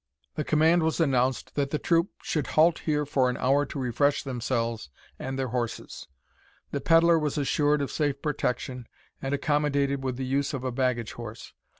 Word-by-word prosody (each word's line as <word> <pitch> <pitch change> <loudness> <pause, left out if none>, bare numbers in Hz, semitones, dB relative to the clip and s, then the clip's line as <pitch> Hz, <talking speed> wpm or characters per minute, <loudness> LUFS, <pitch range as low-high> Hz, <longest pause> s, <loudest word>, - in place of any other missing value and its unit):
The 150 - -2
command 160 +4 +3
was 160 +1 0
announced 130 -5 +1
that 140 -1 0
the 150 - -1
troop 170 +3 +2
should 150 -4 -1
halt 165 +2 +5
here 150 -2 0
for 135 -3 +2
an 125 - -2
hour 140 +2 +2
to - - -7
refresh 140 +3 +1
themselves 115 - -2 0.3
and 135 0 -4
their 130 -1 -2
horses. 120 -1 -4 0.6
The 140 - -2
pedlar 165 +2 +5
was 150 -1 -2
assured 145 0 +2
of 140 - -4
safe 145 -3 -1
protection, 125 -4 -2 0.3
and 135 +1 -1
accommodated 140 -2 0
with 130 -2 -2
the 130 - -3
use 140 +2 0
of 130 - -5
a 130 - -1
baggage 125 -2 -1
horse. 115 -2 -9
140 Hz, 180 wpm, -27 LUFS, 130-150 Hz, 0.6 s, halt